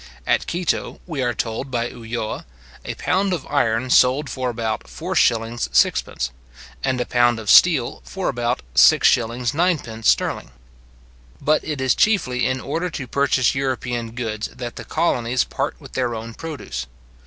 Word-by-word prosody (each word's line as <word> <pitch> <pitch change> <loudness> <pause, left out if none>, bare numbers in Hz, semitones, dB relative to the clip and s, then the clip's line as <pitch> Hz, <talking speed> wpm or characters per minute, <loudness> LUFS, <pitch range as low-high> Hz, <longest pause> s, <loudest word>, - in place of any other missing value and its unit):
At - - +1
Quito, 175 0 -2
we 155 -6 -4
are 120 -2 0
told 115 +5 -3
by 120 -2 -1
Ulloa, 115 - -5 0.4
a - - -5
pound 190 +1 0
of 165 -7 -3
iron 125 -3 0
sold 130 +2 +4
for 130 0 -2
about 115 -2 -3
4s:6d., 120 - +1 0.5
and 130 -1 0
a 125 - 0
pound 120 -1 +3
of 110 - 0
steel 155 -9 +5
for 190 -1 -4
about 120 - -1
6s:9d. 120 - +3
sterling. - - +1 0.9
But 155 +1 +2
it 150 -3 -4
is 130 -2 +3
chiefly 160 - +2
in 130 0 -1
order 165 +7 -2
to 140 -5 -5
purchase 130 -1 +2
European 125 -4 -2
goods 110 -3 -3
that 120 -2 -7
the - - -8
colonies 125 -7 +1
part 140 +2 -3
with 140 -3 -13
their 125 -3 -1
own 115 +1 -7
produce. 110 - -6
125 Hz, 145 wpm, -21 LUFS, 115-145 Hz, 0.9 s, steel